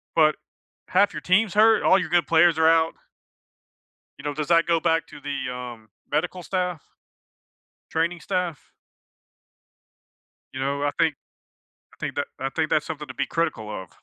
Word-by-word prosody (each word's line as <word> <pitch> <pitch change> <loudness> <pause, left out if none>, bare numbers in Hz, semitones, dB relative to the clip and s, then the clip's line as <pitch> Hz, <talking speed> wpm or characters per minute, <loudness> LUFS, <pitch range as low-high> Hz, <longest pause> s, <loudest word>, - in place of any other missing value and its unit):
But 155 -1 +4 0.5
1/2 200 +2 +3
your - - -4
team's 190 +2 +2
hurt, 220 +1 +5
all 190 - +5
your 180 - -2
good 175 +1 +2
players 165 0 +4
are 160 0 +5
out. 165 0 +3 1.2
You 140 - -12
know, 145 -1 -2
does 150 +1 -3
that 170 -1 +4
go 170 -1 +2
back 165 -1 +1
to - - -12
the, 140 -2 -4
um, 120 -3 -8 0.2
medical 180 +3 -1
staff, 180 -3 -2 1.1
training 165 +2 -1
staff? 180 -5 -3 1.8
You 130 - -6
know, 140 +1 -1
I 145 - +1
think 160 -2 +3 0.8
I - - -27
think - - -4
that - - -1
I 135 +1 -2
think 160 +2 -1
that's 150 - +1
something 150 -3 -6
to 130 - -8
be - - -1
critical 115 -10 -2
of. 95 -4 -6
160 Hz, 165 wpm, -24 LUFS, 145-175 Hz, 1.8 s, hurt